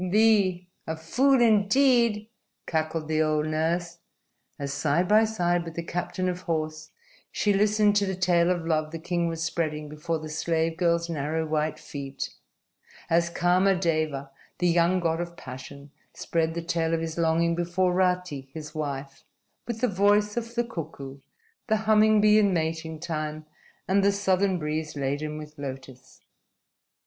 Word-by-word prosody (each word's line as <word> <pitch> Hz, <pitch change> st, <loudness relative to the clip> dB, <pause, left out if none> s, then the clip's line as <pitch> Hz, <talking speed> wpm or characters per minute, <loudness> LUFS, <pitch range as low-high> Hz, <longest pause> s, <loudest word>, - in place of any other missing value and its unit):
"Thee! 200 Hz, -3 st, +3 dB, 0.2 s
A 160 Hz, -, -2 dB
fool 260 Hz, +12 st, +2 dB
indeed!" 230 Hz, 0 st, +3 dB, 0.4 s
cackled 160 Hz, -1 st, -2 dB
the 155 Hz, 0 st, +1 dB
old 155 Hz, -1 st, +1 dB
nurse 165 Hz, +2 st, -1 dB, 0.6 s
as, 140 Hz, -1 st, -4 dB
side 155 Hz, +5 st, +1 dB
by 215 Hz, +3 st, +5 dB
side 175 Hz, -5 st, 0 dB
with 165 Hz, -1 st, -8 dB
the 170 Hz, -, -3 dB
captain 180 Hz, +2 st, -3 dB
of 180 Hz, 0 st, -3 dB
horse, 155 Hz, -2 st, -3 dB, 0.4 s
she 205 Hz, -, +1 dB
listened 210 Hz, +1 st, +3 dB
to 200 Hz, -1 st, +2 dB
the 190 Hz, -, -2 dB
tale 175 Hz, -2 st, +2 dB
of 175 Hz, -2 st, -1 dB
love 155 Hz, -2 st, 0 dB
the 165 Hz, -, -6 dB
king 170 Hz, +1 st, -1 dB
was 165 Hz, -1 st, -3 dB
spreading 155 Hz, -2 st, -2 dB
before 150 Hz, +2 st, -3 dB
the 155 Hz, 0 st, -7 dB
slave 160 Hz, +1 st, -1 dB
girl's 170 Hz, -1 st, +1 dB
narrow, 160 Hz, 0 st, -2 dB
white 155 Hz, 0 st, -1 dB
feet, 140 Hz, -3 st, -6 dB, 0.8 s
as 170 Hz, +1 st, +3 dB
Kama 180 Hz, +3 st, +3 dB
Deva, 155 Hz, -6 st, -1 dB, 0.3 s
the 180 Hz, -, +1 dB
young 170 Hz, +2 st, +3 dB
God 165 Hz, 0 st, 0 dB
of 170 Hz, 0 st, -7 dB
Passion, 135 Hz, +2 st, -10 dB, 0.2 s
spread 165 Hz, -1 st, -1 dB
the 170 Hz, -, -3 dB
tale 165 Hz, -1 st, 0 dB
of -, -, -2 dB
his 165 Hz, 0 st, -4 dB
longing 165 Hz, +1 st, +2 dB
before 175 Hz, +2 st, 0 dB
Rati, 180 Hz, -7 st, 0 dB
his 155 Hz, -1 st, -7 dB
wife, 140 Hz, -3 st, -5 dB, 0.4 s
with 230 Hz, -2 st, -4 dB
the 250 Hz, -, +3 dB
voice 205 Hz, +1 st, +2 dB
of 235 Hz, 0 st, -4 dB
the 240 Hz, -, +2 dB
cuckoo, 145 Hz, -, -7 dB, 0.5 s
the 220 Hz, -1 st, +2 dB
humming 215 Hz, 0 st, +5 dB
bee 210 Hz, 0 st, +6 dB
in 200 Hz, -3 st, +3 dB
mating 160 Hz, -1 st, -2 dB
time, 155 Hz, -1 st, -4 dB, 0.4 s
and 195 Hz, +1 st, +3 dB
the 200 Hz, -, +4 dB
southern 195 Hz, -1 st, +1 dB
breeze 155 Hz, -1 st, -3 dB
laden 145 Hz, +2 st, -2 dB
with 150 Hz, -1 st, -10 dB
lotus. 130 Hz, -2 st, -9 dB
170 Hz, 160 wpm, -26 LUFS, 155-190 Hz, 0.8 s, bee